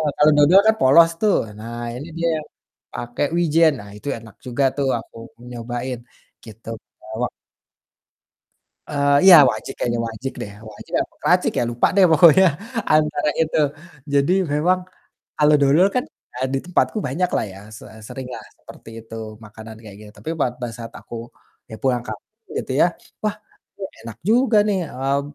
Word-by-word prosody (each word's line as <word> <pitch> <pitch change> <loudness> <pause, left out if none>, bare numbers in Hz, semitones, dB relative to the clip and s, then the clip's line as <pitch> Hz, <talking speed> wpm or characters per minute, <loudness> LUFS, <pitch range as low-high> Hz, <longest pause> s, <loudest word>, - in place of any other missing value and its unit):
kalau 150 +1 +5
dodol 150 +6 +7
kan 220 - +5
polos 165 +6 +6
tuh, 210 -2 +3 0.2
nah 115 +2 -8 0.2
ini 140 +6 -7
dia 170 0 +1 0.6
pakai 120 +4 -3
wijen. 165 -1 +4
Nah 100 -2 -11
itu 125 - -12
enak 110 -3 -14
juga 125 +2 -1
tuh 140 -1 -1
aku 115 - -15 0.4
nyobain, 120 +2 -5 0.5
gitu. 110 0 -14 0.3
Bawa 110 +3 -3 1.6
Eee, 140 0 +2
iya 180 - +11
wajik 110 - -6
kayaknya 120 -1 -1
wajik 115 +4 -6
deh, 100 - -6 0.2
wajik - - -14
apa - - -13
kracik - - +2
ya - - +2
lupa 120 0 +2
deh, 195 - +6
pokoknya 170 +3 +7 0.5
antara 150 -1 +2
itu. 160 0 +1 0.5
Jadi 140 +4 +3 0.2
memang 170 +5 +2 0.6
kalau 150 0 +4
dodol 150 +7 +4
kan, 250 - +1 0.4
ah, 130 - +1
di - - +2
tempatku 180 +4 0
banyaklah 175 +8 -1
ya, 95 - -12 0.2
se - - -13 0.2
seringlah 130 -1 -7 0.2
seperti - - -14
itu, 115 - -11 0.3
makanan 110 +1 -11
kayak 105 -3 -11
gitu. 105 -1 -12
Tapi 160 - -6
pada 125 -1 -2
saat 115 -1 -9
aku, 115 0 -8 0.4
ya 110 - -7
pulang 125 -2 +1
kampung 445 - -11
gitu - - -4
ya, - - +7 0.4
"Wah, 210 0 0 0.4
kok 195 -1 -6
enak 115 -2 -8
juga 235 +3 +3
nih," 200 - +1
eee, 135 +2 -1
140 Hz, 155 wpm, -21 LUFS, 115-165 Hz, 1.6 s, iya